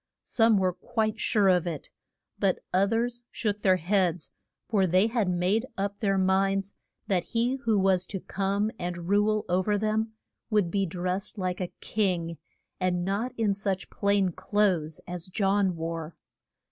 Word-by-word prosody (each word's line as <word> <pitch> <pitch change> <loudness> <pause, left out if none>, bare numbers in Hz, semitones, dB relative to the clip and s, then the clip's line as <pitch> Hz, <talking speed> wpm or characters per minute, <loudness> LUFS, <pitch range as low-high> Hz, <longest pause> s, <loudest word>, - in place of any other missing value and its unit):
Some 225 -2 +3
were 185 -1 +2
quite 220 +2 -2
sure 205 -3 +3
of 180 -1 +3
it; 160 -5 -5 0.5
but 195 -2 +2 0.2
oth 195 +2 +3
ers 240 +1 0
shook 210 -2 -2
their 185 -2 +5
heads, 180 -1 0 0.4
for 195 -4 +2
they 185 +4 +4
had 225 -4 0
made 185 +7 +1
up 200 +1 -2
their 195 -2 +1
minds 195 +1 +1 0.3
that 185 -3 +1
he 240 +3 0
who 220 -2 +3
was 190 -2 +2
to 195 - -4
come 200 +3 -1
and 175 -1 -4
rule 210 +1 +2
o 180 +1 +2
ver 205 +2 +1
them 220 +1 0 0.4
would 210 -6 +2
be 195 0 +1
dressed 180 +5 -3
like 185 -1 -2
a 180 - -3
king, 175 -6 -1 0.4
and 180 -1 0
not 205 +6 -1
in 215 -3 +2
such 195 -1 -3
plain 200 -2 +2
clothes 185 -4 0
as 175 -1 -6
John 195 -1 +1
wore. 165 0 -4
195 Hz, 160 wpm, -28 LUFS, 180-210 Hz, 0.5 s, their